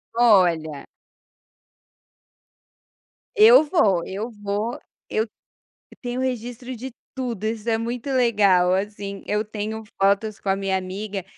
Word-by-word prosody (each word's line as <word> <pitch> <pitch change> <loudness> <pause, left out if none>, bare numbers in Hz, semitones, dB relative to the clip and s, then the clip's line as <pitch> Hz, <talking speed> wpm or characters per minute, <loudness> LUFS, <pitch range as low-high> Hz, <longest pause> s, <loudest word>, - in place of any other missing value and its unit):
Olha. 175 -10 +3 2.5
Eu 440 -1 +8
vou, 210 - +2
eu 210 +5 -4
vou, 205 +2 -3 0.3
eu 220 - 0 0.7
eu - - -22
tenho 245 0 -3
registro 245 0 -4
de 260 +3 -7 0.2
tudo, 240 -6 -4
isso 225 +1 -2
é 225 - +2
muito 240 +4 -4
legal 200 -8 +3
assim, 200 0 -3
eu 210 +1 0
tenho 215 +1 -5 0.2
fotos 200 +2 +2
com 195 - -4
a 195 - +3
minha 195 -1 -1
amiga 195 +1 -5
215 Hz, 120 wpm, -23 LUFS, 195-240 Hz, 2.5 s, Eu